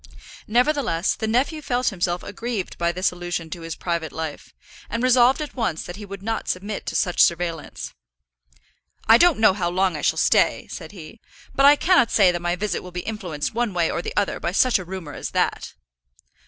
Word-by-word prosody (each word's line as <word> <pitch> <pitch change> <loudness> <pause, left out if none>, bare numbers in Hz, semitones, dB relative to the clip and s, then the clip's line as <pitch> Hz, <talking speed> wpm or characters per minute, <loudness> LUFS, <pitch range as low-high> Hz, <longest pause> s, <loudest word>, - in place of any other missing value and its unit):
Nevertheless, 240 - +1
the 220 - -4
nephew 255 +8 +1
immediately 305 - -11
felt 250 0 0
himself 175 -2 -2
aggrieved 205 -1 -4
by 170 0 +1
this 185 +2 0
allusion 175 -2 -5
to 170 - -6
his 165 -1 -6
private 170 -4 -3
life, 160 -1 -6 0.4
and 230 +2 -2
resolved 255 +3 +4
at 295 - -8
once 220 - -2
that 175 - -8
he 205 -1 -9
would 200 0 -9
not 225 +1 -3
submit 200 +3 -4
to - - -3
such 180 -3 +1
surveillance. 170 -2 0 1.1
"I 225 +1 +7
don't 350 -5 +5
know 220 -3 +5
how 180 -3 -1
long 185 0 +1
I - - -4
shall - - +1
stay," - - +2
said 160 - -8
he; 180 +2 -12 0.3
"but 275 +1 +5
I 290 - +8
cannot 325 -6 +3
say 195 -4 +5
that 175 -1 -4
my 175 0 0
visit 205 +3 -2
will 180 - -10
be 180 0 -5
influenced 180 -9 -4
one 235 -4 -1
way 170 -2 +1
or 170 - -2
the - - -7
other 205 - 0
by 170 - -3
such 250 +1 +3
a - - -6
rumour 180 -4 -7
as - - -5
that." - - -1
190 Hz, 210 wpm, -23 LUFS, 175-230 Hz, 1.1 s, I